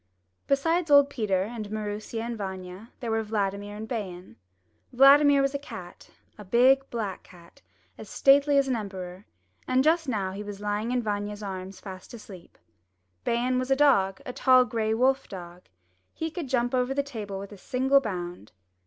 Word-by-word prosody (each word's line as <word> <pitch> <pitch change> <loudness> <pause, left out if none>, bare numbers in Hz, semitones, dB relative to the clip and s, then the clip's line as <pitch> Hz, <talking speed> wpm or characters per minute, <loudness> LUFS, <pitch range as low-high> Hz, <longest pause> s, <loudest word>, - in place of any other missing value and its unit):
Besides 325 +4 +1
old 285 -1 +6
Peter 200 -8 0
and 215 0 -6
Maroosia 215 +1 -4
and 235 0 -4
Vanya 190 +1 -7
there 235 -2 -3
were 225 0 +1
Vladimir 205 -1 -3
and 215 +1 -7
Bayan. 185 - -6 0.6
Vladimir 275 +2 +6
was 275 0 0
a 280 - -2
cat, 180 -10 -10 0.3
a - - -8
big 260 +6 +4
black 210 -6 -4
cat, 170 -2 -18 0.4
as - - -10
stately 280 +1 +4
as 275 -1 +3
an 260 - 0
emperor, 190 -3 -7 0.4
and 255 +1 +3
just 320 -1 +2
now 200 -5 -1
he 195 +2 -6
was 205 -1 -7
lying 210 +2 -2
in 250 -1 0
Vanya's 205 0 -3
arms 190 -1 -6
fast 190 +3 -10
asleep. 195 -6 -13 0.7
Bayan 250 +2 0
was 255 +1 -3
a 270 - +4
dog, 220 -10 +3
a 250 - -6
tall 255 -1 +5
gray 220 -2 -1
wolf 265 +3 +2
dog. 175 -2 -9 0.5
He 320 0 -3
could 315 -4 -6
jump 245 -1 0
over 255 +1 0
the 280 - +1
table 215 -8 -6
with 200 +1 -8
a 205 - -10
single 265 +6 +2
bound. 175 - -6
220 Hz, 175 wpm, -27 LUFS, 195-265 Hz, 0.7 s, old